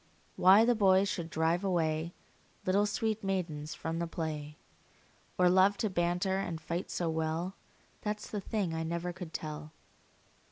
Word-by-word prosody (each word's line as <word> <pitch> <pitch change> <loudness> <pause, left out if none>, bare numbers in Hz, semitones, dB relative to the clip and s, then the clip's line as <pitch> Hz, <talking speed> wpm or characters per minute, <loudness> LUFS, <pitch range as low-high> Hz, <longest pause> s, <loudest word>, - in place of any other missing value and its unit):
Why 195 +5 +7
the 245 - +4
boys 195 -3 +4
should 170 -5 -3
drive 165 +3 +1
away 165 -3 0 0.5
Little 200 +3 +3
sweet 220 0 -1
maidens 165 -6 -2
from 165 +1 -3
the 170 - -1
play, 150 -3 -4 0.8
Or 180 - +5
love 190 +3 +5
to 215 - -1
banter 180 +2 +1
and 170 -4 -3
fight 170 +3 -4
so 175 - -1
well, 160 +3 -1 0.5
That 210 0 -2
's - - -9
the 210 - -2
thing 195 -4 -2
I 160 - -2
never 170 +2 -2
could 175 -2 -8
tell. 155 -1 -6
175 Hz, 160 wpm, -32 LUFS, 160-195 Hz, 0.8 s, Why